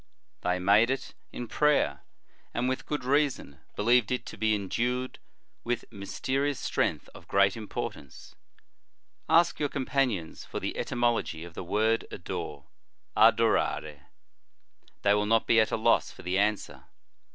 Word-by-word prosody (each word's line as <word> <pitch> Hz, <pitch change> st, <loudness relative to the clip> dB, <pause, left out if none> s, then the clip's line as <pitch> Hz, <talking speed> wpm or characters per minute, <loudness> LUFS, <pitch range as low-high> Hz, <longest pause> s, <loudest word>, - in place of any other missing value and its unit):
They 90 Hz, +1 st, 0 dB
made 100 Hz, +6 st, +4 dB
it 135 Hz, 0 st, -3 dB, 0.2 s
in 120 Hz, -, -6 dB
prayer, 150 Hz, -, +2 dB, 0.5 s
and, 120 Hz, +1 st, 0 dB
with 130 Hz, 0 st, -2 dB
good 150 Hz, -3 st, -2 dB
reason, 135 Hz, -, 0 dB, 0.2 s
believed 120 Hz, +1 st, +3 dB
it 125 Hz, -, -1 dB
to -, -, -8 dB
be 110 Hz, -1 st, +1 dB
endued 120 Hz, +6 st, -2 dB, 0.4 s
with 120 Hz, 0 st, -2 dB
mysterious 130 Hz, +7 st, -2 dB
strength -, -, -1 dB
of -, -, -14 dB
great 100 Hz, -1 st, +3 dB
importance. 105 Hz, -10 st, -7 dB, 1.0 s
Ask 170 Hz, +1 st, +4 dB
your 145 Hz, -1 st, 0 dB
companions 130 Hz, -, -1 dB
for -, -, -5 dB
the -, -, -4 dB
etymology 120 Hz, -9 st, -1 dB
of 85 Hz, -1 st, -10 dB
the -, -, -6 dB
word 110 Hz, +5 st, +1 dB
adore, 70 Hz, -2 st, -6 dB, 0.5 s
adorare. 110 Hz, -9 st, +2 dB, 1.0 s
They 100 Hz, -, +5 dB
will 105 Hz, 0 st, +1 dB
not 115 Hz, 0 st, +3 dB
be 115 Hz, -, +4 dB
at 110 Hz, -, +3 dB
a -, -, +1 dB
loss 110 Hz, -, +3 dB
for -, -, -13 dB
the 90 Hz, +2 st, 0 dB
answer. 105 Hz, 0 st, -1 dB
110 Hz, 140 wpm, -28 LUFS, 100-125 Hz, 1.0 s, They